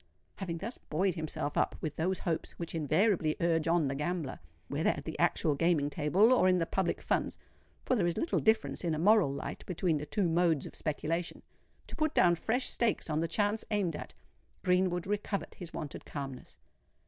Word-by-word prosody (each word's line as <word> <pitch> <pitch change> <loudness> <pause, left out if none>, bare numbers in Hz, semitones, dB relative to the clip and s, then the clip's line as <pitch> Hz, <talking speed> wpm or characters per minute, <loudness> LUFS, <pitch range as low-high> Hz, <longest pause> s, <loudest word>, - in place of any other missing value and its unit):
Having 175 -4 -4
thus 225 +8 -6
buoyed 185 +4 0
himself 155 -3 -3
up - - +1
with 155 -2 -4
those 180 +3 0
hopes 165 -2 -3
which 170 - -6
invariably 165 +1 +2
urge 165 -2 +1
on 165 -3 +3
the 135 - -1
gambler—whether 135 - -3
at - - -2
the - - -5
actual 155 - +2
gaming 150 -1 +1
table 180 - +4
or 215 -7 +4
in 185 - +4
the 165 - +1
public 185 +1 -1
funds - - 0 0.5
(for 255 - +1
there 190 -7 +2
is 170 - -1
little 335 - +1
difference 220 -3 +1
in 165 -3 0
a - - -3
moral 200 -2 +4
light 140 - -5
between 175 -3 0
the 150 +1 -5
two 200 +2 +1
modes 165 -3 +2
of - - -8
speculation),—to 165 +3 -5
put 310 -1 0
down 175 -1 +5
fresh 225 +9 0
stakes 230 -8 +1
on 155 - +1
the 165 - 0
chance 205 +5 0
aimed 200 -7 0
at, - - -8 0.5
Greenwood 180 -1 +2
recovered 205 0 -2
his 175 -3 -8
wonted 155 -4 -6
calmness. 135 -3 -7
170 Hz, 185 wpm, -31 LUFS, 155-195 Hz, 0.5 s, down